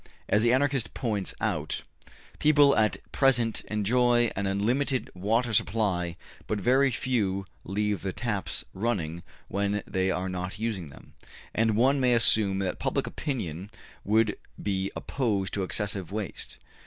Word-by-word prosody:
As 105 Hz, -, +3 dB
the 120 Hz, +1 st, +4 dB
Anarchists 135 Hz, -2 st, +2 dB
point 105 Hz, -6 st, -2 dB
out, -, -, -2 dB, 0.6 s
people 145 Hz, -2 st, +5 dB
at 110 Hz, -1 st, +2 dB
present 120 Hz, -5 st, +2 dB
enjoy 120 Hz, +3 st, +2 dB
an 100 Hz, 0 st, -1 dB
unlimited 125 Hz, +7 st, 0 dB
water 115 Hz, +6 st, 0 dB
supply 95 Hz, -6 st, +1 dB, 0.3 s
but 105 Hz, -, -1 dB
very 130 Hz, +6 st, +4 dB
few 105 Hz, -6 st, -1 dB, 0.2 s
leave 105 Hz, -1 st, -1 dB
the 95 Hz, -, -2 dB
taps 105 Hz, -2 st, -3 dB
running 95 Hz, -6 st, -2 dB, 0.3 s
when 100 Hz, +1 st, -1 dB
they 95 Hz, 0 st, 0 dB
are 95 Hz, 0 st, -1 dB
not 90 Hz, 0 st, -4 dB
using 105 Hz, -8 st, -3 dB
them. 70 Hz, -, -15 dB, 0.4 s
And 110 Hz, -1 st, +2 dB
one 135 Hz, +4 st, +4 dB
may 125 Hz, -2 st, +4 dB
assume 110 Hz, -4 st, +4 dB
that 95 Hz, -2 st, -2 dB
public -, -, 0 dB
opinion 95 Hz, -, -4 dB, 0.3 s
would 110 Hz, +1 st, +2 dB, 0.2 s
be 95 Hz, -1 st, -1 dB
opposed 105 Hz, -8 st, -1 dB
to 100 Hz, -, -1 dB
excessive 95 Hz, -2 st, -2 dB
waste. 105 Hz, -1 st, -5 dB
105 Hz, 140 wpm, -28 LUFS, 95-120 Hz, 0.6 s, people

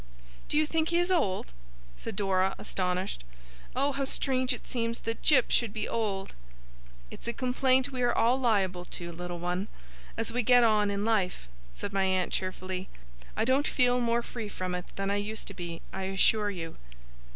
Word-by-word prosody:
'Do 295 Hz, -, +2 dB
you 310 Hz, -, +4 dB
think 320 Hz, +1 st, 0 dB
he 340 Hz, -, +2 dB
is 350 Hz, +2 st, +2 dB
old?' 190 Hz, -, +1 dB, 0.4 s
said -, -, -6 dB
Dora, 190 Hz, -1 st, +1 dB
astonished. 180 Hz, -, -2 dB, 0.5 s
'Oh, 275 Hz, +2 st, +2 dB
how 275 Hz, 0 st, -2 dB
strange 260 Hz, -1 st, +1 dB
it 245 Hz, -, -3 dB
seems 230 Hz, -1 st, -2 dB
that 225 Hz, 0 st, -3 dB
Jip 265 Hz, -5 st, +4 dB
should 235 Hz, -4 st, +3 dB
be 215 Hz, -, -2 dB
old!' 200 Hz, -4 st, -2 dB, 0.8 s
'It's -, -, -8 dB
a 235 Hz, -, -1 dB
complaint 260 Hz, +1 st, +2 dB
we 255 Hz, -1 st, -3 dB
are 245 Hz, -1 st, +3 dB
all 240 Hz, +3 st, +3 dB
liable 195 Hz, -7 st, +1 dB
to, 170 Hz, -1 st, -5 dB
Little 175 Hz, +1 st, -5 dB
One, 180 Hz, +3 st, -2 dB, 0.5 s
as 225 Hz, 0 st, -1 dB
we 245 Hz, -, +2 dB
get 245 Hz, +1 st, +6 dB
on 210 Hz, -2 st, +4 dB
in 200 Hz, +1 st, -1 dB
life,' 195 Hz, -, 0 dB, 0.2 s
said 195 Hz, -, -5 dB
my 195 Hz, -1 st, +2 dB
aunt, 185 Hz, -1 st, +1 dB
cheerfully; 185 Hz, 0 st, -3 dB, 0.5 s
'I -, -, +2 dB
don't 265 Hz, +4 st, +3 dB
feel 250 Hz, -1 st, +3 dB
more 235 Hz, 0 st, +1 dB
free 225 Hz, -4 st, -6 dB
from 185 Hz, -2 st, -4 dB
it 180 Hz, 0 st, -3 dB
than 195 Hz, 0 st, -1 dB
I 200 Hz, -, +1 dB
used 210 Hz, +1 st, -3 dB
to -, -, -7 dB
be, 170 Hz, -2 st, -6 dB
I 190 Hz, 0 st, -3 dB
assure 205 Hz, +2 st, +3 dB
you. 165 Hz, -5 st, -6 dB
210 Hz, 185 wpm, -29 LUFS, 185-250 Hz, 0.8 s, get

